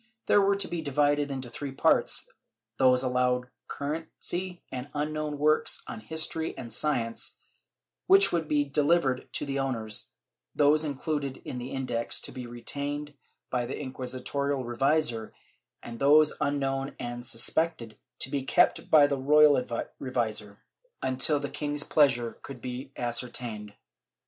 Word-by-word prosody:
These - - +5
were 200 0 +3
to 200 - 0
be 170 -1 -3
divided 145 0 +1
into 130 -2 -4
three 140 +3 -5
parts; 135 - +3 0.5
those 130 -1 +5
allowed 125 0 0 0.2
currency 165 +4 -4
and 130 +2 -5
unknown 150 0 -2
works 155 +1 +2
on - - -7
history 160 +6 -2
and 115 -3 -7
science, 115 -4 -1 0.7
which 390 +1 +7
could 165 -3 -1
be 145 -1 +2
delivered 145 -2 +1
to - - -1
the 140 -1 -2
owners; 115 -6 -2 0.5
those 150 +1 +4
included 145 -2 -3
in 125 - -5
the 125 +1 -6
Index, 125 -4 -2
to - - -4
be 125 -2 -7
retained 145 +5 -4 0.4
by 125 -2 0
the 130 - -4
inqui 130 -2 -6
sitorial 135 +1 -2
revisor, 120 -2 0 0.5
and 115 -1 -8
those 150 +2 +6
unknown 135 -1 -1
and 120 0 -5
suspected, 120 -1 -1 0.2
to 130 - +1
be 140 - 0
kept 130 - +2
by 150 -2 +7
the 140 -1 0
royal 145 -1 +5 0.4
revisor, 110 -6 -2 0.5
until 130 +3 +3
the 145 - -3
king's 145 +1 -2
pleasure 125 -7 +2
could 135 -3 -9
be 130 +2 -6
ascertained. 120 -3 -3
135 Hz, 140 wpm, -28 LUFS, 125-150 Hz, 0.7 s, which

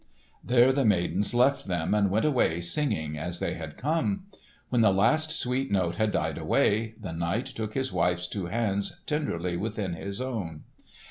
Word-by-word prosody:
There 125 +1 +5
the 135 +1 +1
maidens 100 -1 +2
left 130 +1 +3
them 85 -1 0
and 105 -2 +3
went 105 +7 +1
away 125 - +2
singing 85 - -1
as 85 +2 -3
they - - -2
had 80 -2 -7
come. 165 +7 0 0.4
When 120 -2 +2
the 110 -3 +5
last 120 +12 +3
sweet 135 -3 -1
note 90 -3 +1
had 110 -1 +2
died - - -1
away, 110 +2 +1
the 95 -6 -6
knight 85 +9 -1
took 110 -1 -5
his 130 -6 -1
wife's 90 0 +1
two 95 -2 -4
hands 100 -1 -1
tenderly 90 - -1
within 105 -2 -3
his 100 +4 -5
own. 105 -12 -4
105 Hz, 175 wpm, -28 LUFS, 90-125 Hz, 0.4 s, There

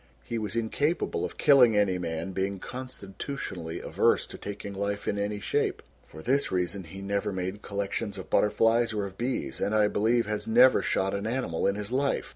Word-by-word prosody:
He 115 - -3
was 110 +1 -4
incapable 145 +8 0
of - - -4
killing 125 -6 +6
any 95 -3 +2
man, 85 +1 -3
being 95 +1 -1
constitutionally 100 - -6
averse - - +2
to - - -10
taking 100 0 -6
life 100 +1 -3
in 100 - 0
any 105 0 -2
shape. 100 - -1 0.2
For 80 - -11
this 140 +3 +1
reason 90 +1 -1
he 95 +4 -9
never 100 +1 -1
made 95 +2 -4
collections 100 0 -3
of - - -7
butterflies 115 +2 +3
or 105 -2 -1
of 95 -1 -8
bees, 115 - -3
and 105 - +1
I 105 -1 +5
believe 115 +3 +2
has 105 0 -3
never 125 +3 +6
shot 95 +1 0
an 100 +2 -2
animal 115 -9 -1
in 100 - +1
his 105 +1 -5
life. 135 +2 0
100 Hz, 190 wpm, -28 LUFS, 95-115 Hz, 0.2 s, killing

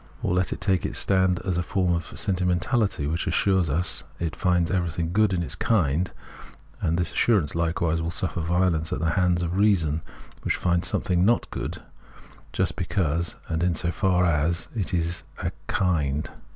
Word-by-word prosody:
Or - - +1
let 90 0 +1
it - - -4
take 95 -4 +1
its - - -3
stand 95 -2 +2
as 90 -3 0
a - - +2
form 90 0 0
of 85 -1 -2
sentii 95 -1 -2 0.2
mentahty 95 - 0
which 80 +4 -2
assures 95 -5 +2
us 85 +6 +1 0.2
it 85 -2 -2
finds 90 -3 +1
everything 85 -3 -1
good 105 0 +3
in 90 -2 0
its - - -6
kind, 90 - +1 0.7
and 80 +1 +1
this 85 -2 0
assurance 100 -11 +2
likewise 85 0 0
will 80 - -2
suffer 85 0 -1
violence 85 -1 +1
at - - -1
the 85 +3 0
hands 90 -1 +2
of 85 +2 -2
reason, 85 -7 +3 0.4
which - - 0
finds 85 -1 0
some - - 0
thing 90 -3 +1
not 115 +5 +3
good - - -5 0.7
just - - -1
because 85 -3 -1
and 80 0 -2
in 90 -1 +1
so 85 - 0
far 90 -1 +2
as 85 +1 +1
it 100 -5 0
is 85 -1 -1 0.2
a - - -1 0.2
kind. 75 -6 0
85 Hz, 185 wpm, -25 LUFS, 85-95 Hz, 0.7 s, good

